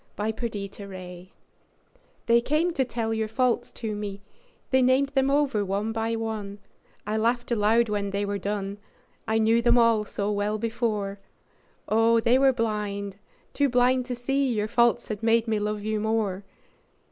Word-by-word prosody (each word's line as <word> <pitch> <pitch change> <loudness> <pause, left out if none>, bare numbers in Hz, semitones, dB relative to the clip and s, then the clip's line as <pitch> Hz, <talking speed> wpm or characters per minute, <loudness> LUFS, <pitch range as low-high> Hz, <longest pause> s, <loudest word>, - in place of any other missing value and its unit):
Faults 220 +2 -3 1.8
They 235 0 +4
came 320 +6 +1
to 275 - +1
tell 230 -2 -2
your 220 -1 -1
faults 245 +1 0
to 220 -3 -4
me, 200 -1 -6 0.5
They 260 0 +4
named 260 +2 +3
them 270 -1 +1
over 275 -7 +2
one 200 +3 -2
by 225 0 -1
one; 215 -3 -4 0.5
I 215 +1 -1
laughed 240 +2 0
aloud 225 +1 +3
when 205 -1 -2
they 200 +1 -1
were 200 0 -2
done, 200 +1 -3 0.5
I 220 0 +1
knew 225 +1 +3
them 240 +1 +4
all 230 -2 +4
so 205 0 -2
well 205 +1 -1
before, 215 -3 -2 0.7
Oh, 225 +1 +4
they 235 +3 +3
were 270 0 +5
blind, 210 -4 -3 0.4
too 285 -1 +2
blind 250 0 +2
to 250 - -3
see 270 +2 0
Your 210 -2 -1
faults 235 +1 +2
had 210 -2 -4
made 230 0 +2
me 220 -1 +1
love 210 0 -2
you 215 0 -1
more. 210 -3 -1
225 Hz, 160 wpm, -26 LUFS, 210-240 Hz, 1.8 s, were